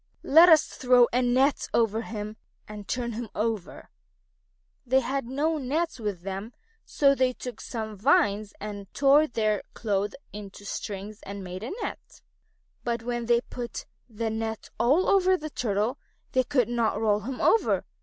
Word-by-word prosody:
Let 330 +5 +7
us 315 -2 +7
throw 250 -1 +4
a 250 - +3
net 255 +3 +2
over 225 -1 +2
him 215 -1 -6 0.3
and 210 -1 -9
turn 245 -1 -2
him 230 0 -5
over." 215 -3 -3 0.9
They 260 +2 +3
had 270 -1 -2
no 300 +5 0
nets 295 +3 -2
with 205 -6 -4
them, 195 +4 -5 0.3
so 275 -1 +3
they 255 -2 +1
took 250 0 -8
some 220 -3 -5
vines, 205 -2 +2
and 205 -1 -7
tore 285 +2 +5
their 215 -4 0
clothes 205 -2 -1 0.2
into 205 -1 -9
strings 205 +1 -6
and 200 0 -7
made 185 0 -7
a 230 - -5
net. - - -8 0.6
But 235 -1 -2
when 240 -1 -3
they 240 - +5
had - - -32
put 240 -1 -6 0.2
the 225 0 -3
net 220 0 -4
all 285 +10 +3
over 375 -1 +4
the 310 -2 -7
Turtle, 220 +2 -1 0.3
they 255 -1 +2
could 255 -4 +2
not 235 -2 0
roll 210 -2 +2
him 250 +5 -6
over. 455 - +3
235 Hz, 165 wpm, -27 LUFS, 210-260 Hz, 0.9 s, Let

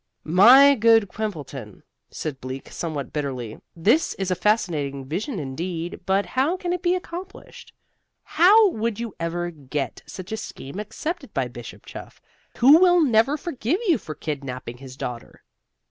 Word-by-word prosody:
"My 245 - +7
good 225 -3 +4
Quimbleton," 145 - -6 0.3
said 145 -4 -6
Bleak, 130 +1 -7
somewhat 155 -5 -5
bitterly, 130 -7 -4 0.2
"this 215 - +2
is 190 -1 -3
a - - +2
fascinating 155 -11 0
vision 195 - -4
indeed, 165 +4 -4
but 195 +1 +2
how 280 +8 0
can 355 -1 -2
it 360 - -3
be 355 0 +2
accomplished? 365 +1 -9 0.5
How 410 +5 +5
would 225 -3 -2
you 230 -4 -5
ever 175 +1 -2
get 145 -2 -5
such 185 0 -9
a 220 - -2
scheme 185 -6 -8
accepted 225 - -5
by - - 0
Bishop - - -11
Chuff, - - -10 0.4
who 280 +6 +7
will 355 -1 +5
never 270 -1 +3
forgive 300 - -2
you 330 -9 +3
for 155 - -8
kidnaping 130 -5 -6
his 130 0 -11
daughter? 120 -3 -7
195 Hz, 150 wpm, -23 LUFS, -, 0.5 s, My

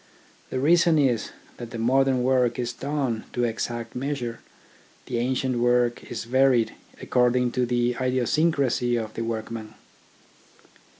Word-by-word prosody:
The 130 - -2
reason 170 +3 +4
is, 130 -6 +1 0.3
that 120 -1 -7
the 115 - -7
modern 130 +2 +2
work 125 -2 +2
is 120 -1 -2
done 135 -4 -2
to 120 - 0
exact 115 0 -3
measure, 125 -3 -3 0.7
the 120 -2 -2
ancient 130 0 0
work 120 0 +2
is 115 - -4
varied 125 -1 +3 0.3
according 125 0 +2
to 125 0 0
the 120 0 +1
idiosyncrasy 130 0 +1
of 110 -2 -3
the - - -4
workman. 110 -1 -5
125 Hz, 130 wpm, -25 LUFS, 120-130 Hz, 0.7 s, reason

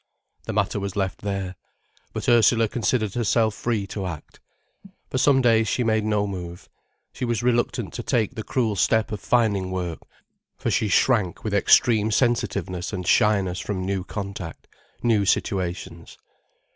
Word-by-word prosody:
The - - -4
matter - - 0
was 100 0 -4
left 95 -2 -2
there. 100 -2 -3 0.6
But - - -5
Ursula 115 -1 +5
considered 110 -3 -1
herself 115 -2 +1
free 110 -2 -2
to 100 -1 -5
act. 80 -4 -8 0.7
For 130 - 0
some 135 -1 +4
days 115 -2 +4
she 125 - 0
made 110 -2 +1
no 105 -1 +1
move. 90 -3 -7 0.5
She - - -6
was 120 -1 -1
reluctant 120 -1 0
to - - -4
take 115 0 0
the 115 - -5
cruel 110 -2 -1
step 110 +3 +2
of 105 - -3
finding 105 -6 +1
work, 90 -3 -3 0.6
for - - -2
she 110 - +1
shrank 105 -2 +2
with 110 - -3
extreme 110 +2 +4
sensitiveness 100 -6 0
and 90 -3 -4
shyness 95 -3 +2
from 95 -1 -3
new 95 -1 -2
contact, 100 -5 -7 0.4
new 110 -4 +3
situations. 90 -3 -2
105 Hz, 155 wpm, -24 LUFS, 95-115 Hz, 0.7 s, Ursula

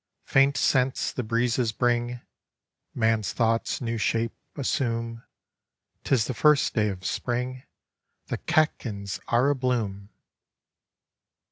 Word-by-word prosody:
Paint 135 +1 +3
scents 130 -1 +2
the - - -3
breezes 120 +1 +1
bring; 120 +1 0 0.8
Kan's 110 -2 +1
thoughts 115 +1 0
new 115 -2 -2
shape 115 +2 0 0.2
assume. 115 -4 -2 0.8
*Tis 120 -5 +2
the 130 - -3
first 150 +3 +3
day 105 -2 +2
of 95 -2 -6
Spring, 125 +5 -2 0.6
The - - -4
catkins 110 - 0
are 125 +4 +3
a - - +1
blooa! 110 -7 -2
120 Hz, 110 wpm, -26 LUFS, 115-130 Hz, 0.8 s, Paint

